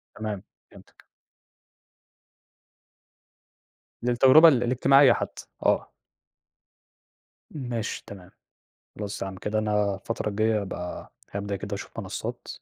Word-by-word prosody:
تمام، 105 -2 -4 0.3
فهمتك. - - -18 3.0
للتجربة 130 +7 +7
ال 130 -6 +4
الاجتماعية 130 +2 +5
حتّى، - - -5 0.2
آه. - - +1 1.6
ماشي 120 -6 -4
تمام، 95 -2 -11 0.7
خلاص 105 -1 -5
يعني 95 -1 -5
كده 110 +1 -1
أنا 105 -2 +1
الفترة 115 +2 -3
الجاية 110 +1 +1
هابقى 90 -2 -7 0.2
هابدأ 100 0 -3
كده 100 +1 -5
أشوف - - -8
منصات - - -6
105 Hz, 95 wpm, -26 LUFS, 100-120 Hz, 3.0 s, للتجربة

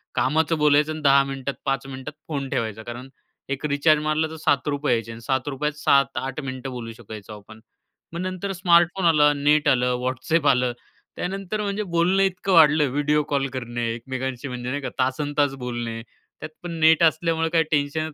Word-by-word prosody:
कामाचं 160 +4 +1
बोलायचं 150 +1 +3
अन् 155 - -7
10 140 0 +6
मिनिटात, 135 0 -4
5 135 0 -1
मिनिटात 130 +2 -7
फोन 140 -4 -3
ठेवायचा. 110 -1 -3
कारण 120 +3 -8 0.4
एक 140 +2 -3
रिचार्ज 150 +1 +3
मारला 155 +1 +1
तर 160 - -8
₹7 145 -2 0
यायचे 115 0 -2
अन् 115 - -9
₹7 135 +4 -1
त - - -20
7-8 135 -1 +1
मिनिटं 130 0 -6
बोलू 115 -2 -6
शकायचो 110 -2 -10
आपण. 110 +2 -15 0.5
मग 170 - -4
नंतर 185 +1 -4
स्मार्टफोन 175 +1 +3
आला, 150 -3 +5
नेट 150 +1 +2
आलं, 125 -2 +3
WhatsApp 135 +5 0
आलं. 125 -2 +2 0.4
त्यानंतर 195 +3 -3
म्हणजे 205 +1 -2
बोलणं 180 +2 +2
इतकं 190 0 -1
वाढलं, 150 -4 +6
व्हिडिओ 150 +1 +1
कॉल 140 -1 0
करणे, 120 -2 -3
एकमेकांशी 130 +2 -5
म्हणजे 125 -1 -5
नाही 145 +2 -3
का - - -4
तासंतास 145 +2 0
बोलणे. 120 -2 -4 0.4
त्यात 155 - -7
पण 175 - -5
नेट 160 +1 +5
असल्यामुळं 165 0 +2
काही 165 -1 +3
टेन्शनच 150 +2 -1
145 Hz, 170 wpm, -23 LUFS, 130-160 Hz, 0.5 s, 10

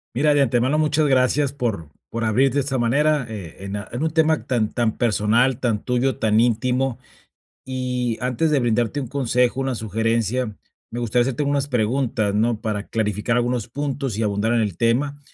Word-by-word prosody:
Mira, 150 +3 +3
de 145 - +3
antemano, 130 +2 +2
muchas 155 0 +2
gracias 135 +1 +2
por 110 - -3 0.2
por 115 0 -3
abrirte 130 +5 +2
de 145 - +3
esta 135 -1 -1
manera, 140 +4 +2
eh, 95 -4 -8
en 100 +1 -4
a 100 - -7
en 130 +6 -2
un 160 - 0
tema 160 0 +2
tan 115 -5 0
tan 115 -3 0
personal, 120 +3 +2
tan 115 -4 0
tuyo, 125 +1 0
tan 110 0 +3
íntimo. 125 +2 0 0.7
Y 125 -2 -2
antes 130 +5 0
de 145 - +3
brindarte 120 +3 0
un 130 - -5
consejo, 125 -1 +1
una 135 -1 -1
sugerencia, 115 +1 -1 0.4
me 120 - -3
gustaría 120 +1 +2
hacerte 130 +3 -1
unas 140 -1 0
preguntas, 120 -4 0
¿no?, 110 0 +1
para 105 -2 -3
clarificar 105 +1 -1
algunos 120 -2 -1
puntos 140 -3 -3
y 110 - -1
abundar 105 +2 0
en 120 - +2
el 105 -6 -2
tema. 140 +5 0
120 Hz, 185 wpm, -22 LUFS, 110-135 Hz, 0.7 s, Mira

